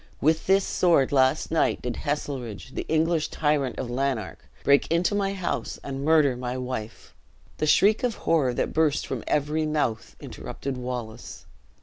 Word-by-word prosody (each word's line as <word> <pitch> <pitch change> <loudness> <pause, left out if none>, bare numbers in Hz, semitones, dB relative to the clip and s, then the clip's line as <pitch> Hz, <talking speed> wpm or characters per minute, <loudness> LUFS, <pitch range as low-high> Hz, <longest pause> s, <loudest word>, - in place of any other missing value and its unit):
With 160 +2 +1
this 195 +1 +4
sword, 165 -7 +3
last 135 +3 +2
night, 165 - +1
did 125 -1 -3
Heselrigge, 130 - -4
the - - -5
English 160 0 +2
tyrant 150 -3 0
of 130 - -3
Lanark, 130 -3 -3
break 140 0 +4
into 170 +4 +2
my 200 -1 0
house, 185 -3 -3
and 135 0 -5
murder 150 -4 +4
my 125 0 -4
wife!" 125 -4 -6 0.4
The 155 - -1
shriek 205 +7 +4
of 245 -4 0
horror 135 -7 +2
that - - -1
burst 155 -2 +2
from - - -4
every 150 +2 0
mouth, 145 -7 -2
interrupted 140 -1 -6
Wallace. 125 -2 -6
145 Hz, 155 wpm, -26 LUFS, 125-160 Hz, 0.4 s, this